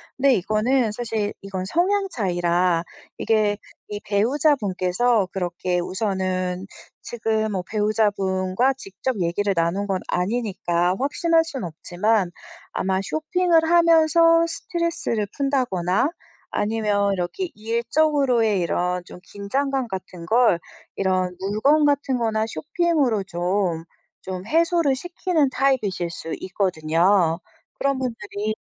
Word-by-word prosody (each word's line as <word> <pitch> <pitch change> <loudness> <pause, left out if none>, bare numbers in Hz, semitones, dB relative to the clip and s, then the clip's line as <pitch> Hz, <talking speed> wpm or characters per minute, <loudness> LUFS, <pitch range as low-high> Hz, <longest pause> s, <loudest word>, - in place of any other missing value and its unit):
근데 270 0 +4
이거는 215 +4 +1
사실 220 -3 -2
이건 190 -2 -5
성향 390 - +1
차이라 175 - +1 0.3
이게 215 -2 +1 0.3
이 205 -1 -4
배우자분께서 215 - +1
그렇게 180 -1 -1
우선은 185 -1 -2 0.4
지금 220 -2 -1
뭐 190 -3 -2
배우자분과 210 +1 +1
직접 205 +2 -4
얘기를 195 +4 0
나눈 175 +4 0
건 190 -2 0
아니니까 180 -3 0
확신할 325 +5 +2
순 275 - -5
없지만 180 +4 0 0.4
아마 190 0 -1
쇼핑을 325 - +1
하면서 330 0 +5
스트레스를 335 - -1
푼다거나 250 - +1 0.4
아니면 205 -2 0
이렇게 195 - -2
일적으로의 235 -1 +1
이런 180 +1 -1
좀 - - -12
긴장감 265 +5 -1
같은 185 -3 -7
걸 225 -2 +3 0.4
이런 185 -2 0
물건 215 +11 +2
같은 280 -2 +1
거나 220 -2 0
쇼핑으로 295 - 0
좀, 175 -1 -1 0.4
좀 185 0 -6
해소를 330 - +2
시키는 340 -1 0
타입이실 225 -10 0
수 165 0 -7
있거든요. 175 -1 +1 0.4
그런 275 -1 +1
분들이 215 -4 -3
215 Hz, 265 characters per minute, -23 LUFS, 185-270 Hz, 0.4 s, 하면서